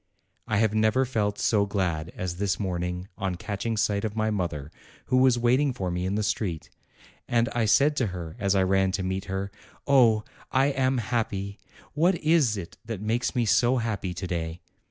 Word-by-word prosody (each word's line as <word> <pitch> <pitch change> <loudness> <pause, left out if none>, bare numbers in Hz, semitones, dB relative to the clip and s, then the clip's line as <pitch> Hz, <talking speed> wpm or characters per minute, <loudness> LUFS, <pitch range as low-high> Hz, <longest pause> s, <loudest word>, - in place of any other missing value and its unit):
I 110 - +1
have 110 0 +2
never 110 +4 +3
felt 105 -5 -1
so 100 -2 +2
glad 85 -5 -1
as 90 -2 -4
this 100 0 0
morning 90 -2 -3
on 95 -2 -1
catch 100 +4 -4
ing 115 -1 -1
sight 105 -1 +1
of 110 -1 -3
my 110 0 0
mother, 80 -7 -3 0.3
who 130 - +2
was 130 -1 +5
waiting 130 +4 +2
for 95 -7 -3
me 90 +1 -2
in 95 - -1
the 105 - 0
street. 95 -5 -2 0.6
And 120 0 +2
I 120 -2 0
said 145 +7 +4
to 125 - +2
her 85 -4 -6
as 100 -1 +1
I 95 - +4
ran 95 0 +2
to 95 0 -1
meet 95 +1 -2
her: 95 +1 -3 0.3
"Oh, 120 -6 +5 0.3
I 135 +2 +3
am 130 -1 +1
happy! 100 -3 -2 0.3
what 170 +5 +3
is 155 -9 +2
it 85 -3 -8
that 115 -3 -5
makes 115 +6 -1
me 120 -2 +2
so 120 +4 +3
happy 105 -6 -2
to 95 - -4
day?" 85 -1 -4
105 Hz, 195 wpm, -26 LUFS, 95-120 Hz, 0.6 s, was